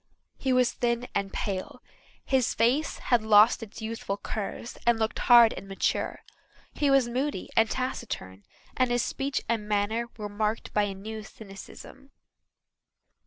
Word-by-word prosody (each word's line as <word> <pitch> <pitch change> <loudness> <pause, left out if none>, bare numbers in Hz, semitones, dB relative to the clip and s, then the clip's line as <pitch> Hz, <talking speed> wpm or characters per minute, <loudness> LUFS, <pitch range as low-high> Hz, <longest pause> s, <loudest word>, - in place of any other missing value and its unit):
He 265 - 0
was 255 -1 +3
thin 240 0 -1
and 200 -1 -1
pale; 195 +5 -4 0.4
his 260 -3 +1
face 265 +7 +1
had 240 -2 +2
lost 215 +2 +5
its 225 0 -9
youthful 220 -3 -4
curves 215 +3 -5
and 235 -1 +3
looked 220 0 -1
hard 235 -2 +7
and 195 - -9
mature. 195 0 -1 0.5
He 290 - +1
was 270 -3 +4
moody 255 -3 -2
and 225 0 +4
taciturn 225 - -4 0.3
and 255 -1 +2
his 245 0 +1
speech 275 0 -2
and 225 -2 -1
manner 210 +3 0
were 210 -2 -4
marked 210 +2 -2
by 210 -1 +3
a 195 -1 -4
new 215 +3 -7
cynicism. 215 +6 -12
225 Hz, 150 wpm, -27 LUFS, 205-245 Hz, 0.5 s, hard